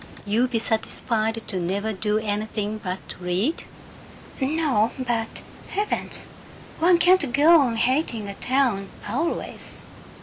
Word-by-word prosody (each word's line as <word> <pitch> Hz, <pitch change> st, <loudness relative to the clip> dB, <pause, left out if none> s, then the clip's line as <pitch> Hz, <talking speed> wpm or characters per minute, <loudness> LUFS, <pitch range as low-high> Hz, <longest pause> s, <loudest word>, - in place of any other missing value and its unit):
"You 225 Hz, +5 st, +2 dB
be 245 Hz, -2 st, -1 dB
satisfied 225 Hz, 0 st, -1 dB
to 190 Hz, -, -2 dB
never 200 Hz, +5 st, -1 dB
do 210 Hz, +2 st, 0 dB
anything 215 Hz, 0 st, -2 dB
but 185 Hz, -2 st, -3 dB, 0.2 s
read?" 185 Hz, -, -1 dB, 0.8 s
"No, 265 Hz, -6 st, +2 dB
but 235 Hz, -3 st, -2 dB, 0.3 s
Heavens, 415 Hz, +1 st, -1 dB, 0.5 s
one 345 Hz, +2 st, +5 dB
can't 345 Hz, -5 st, +4 dB
go 310 Hz, +5 st, +7 dB
on 245 Hz, -4 st, +1 dB
hating 235 Hz, -3 st, 0 dB
a 200 Hz, -, -5 dB
town 245 Hz, -5 st, +1 dB, 0.2 s
always!" 275 Hz, +11 st, -3 dB
225 Hz, 115 wpm, -24 LUFS, 210-275 Hz, 0.8 s, go